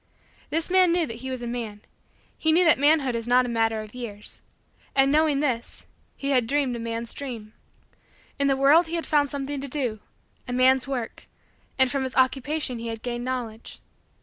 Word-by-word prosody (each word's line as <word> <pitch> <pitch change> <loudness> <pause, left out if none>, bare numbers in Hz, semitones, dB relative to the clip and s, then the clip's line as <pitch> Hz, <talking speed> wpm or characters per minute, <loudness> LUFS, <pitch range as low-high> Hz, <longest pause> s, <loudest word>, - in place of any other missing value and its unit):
This 325 +3 -2
man 370 -2 +5
knew 345 -1 +2
that 230 -5 -7
he 260 +2 -7
was 255 -2 -4
a - - -4
man. 230 -4 -5 0.5
He 315 - +1
knew 350 +3 +5
that 310 -5 +5
manhood 285 -3 +3
is 230 0 -3
not 250 +1 +4
a - - -4
matter 225 -1 0
of 215 -1 -11
years. 220 -5 -6 0.5
And, 270 0 +4
knowing 300 -2 +3
this, 250 -6 -2 0.3
he 280 0 -2
had 250 -4 +2
dreamed 275 -2 0
a - - -5
man's 230 0 -4
dream. 230 -6 -7 0.9
In 280 - +3
the 270 -1 +2
world 295 +5 +5
he 335 - -4
had 335 - -2
found 290 -2 +2
something 280 0 -4
to 280 - -5
do 250 -6 -2 0.5
a 245 - -4
man's 255 +1 +4
work 250 -4 -5 0.5
and 260 -1 +4
from 275 - -1
his 260 -1 -3
Occupation 260 0 +1
he 230 - -5
had 225 -1 -6
gained 240 0 -3
Knowledge. 240 -4 -5
260 Hz, 200 wpm, -25 LUFS, 235-285 Hz, 0.9 s, man